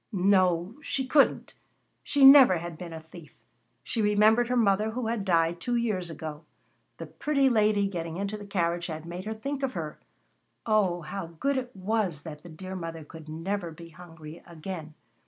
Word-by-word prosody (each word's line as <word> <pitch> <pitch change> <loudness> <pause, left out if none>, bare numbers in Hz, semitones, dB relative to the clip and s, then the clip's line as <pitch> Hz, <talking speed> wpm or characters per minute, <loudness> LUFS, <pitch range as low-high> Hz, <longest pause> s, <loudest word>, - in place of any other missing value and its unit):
No, 185 0 +2
she 265 -2 -2
couldn't. 280 +2 +2 0.5
She 280 -2 +3
never 270 -9 +9
had 170 0 -6
been 170 +1 -8
a 160 - -7
thief. 160 0 -14 0.5
She 230 - -2
remembered 215 +3 +4
her 250 0 0
mother, 210 -1 +2
who 240 +2 -4
had 225 -2 -1
died 170 -2 +1
two 245 - -1
years 210 -7 -1
ago. 155 -1 -7 0.5
The - - -6
pretty 275 -3 +1
lady 210 -3 +2
getting 170 -3 -5
into 200 +2 -3
the 205 -1 -9
carriage 170 -3 -1
had 160 -1 -6
made 175 +3 -7
her 220 - -3
think 275 +5 -4
of 270 -1 -1
her! 155 -4 -5 0.7
Oh! 200 -6 +2
how 170 +3 -6
good 170 - -2
it 250 -2 -5
was 190 -5 -1
that 150 -3 -9
the 175 - -12
dear 185 +4 -8
mother 165 -3 -6
could 160 0 -12
never 175 +3 -3
be 165 +1 -12
hungry 165 -1 -12
again. 165 -2 -8
185 Hz, 180 wpm, -27 LUFS, 165-220 Hz, 0.7 s, never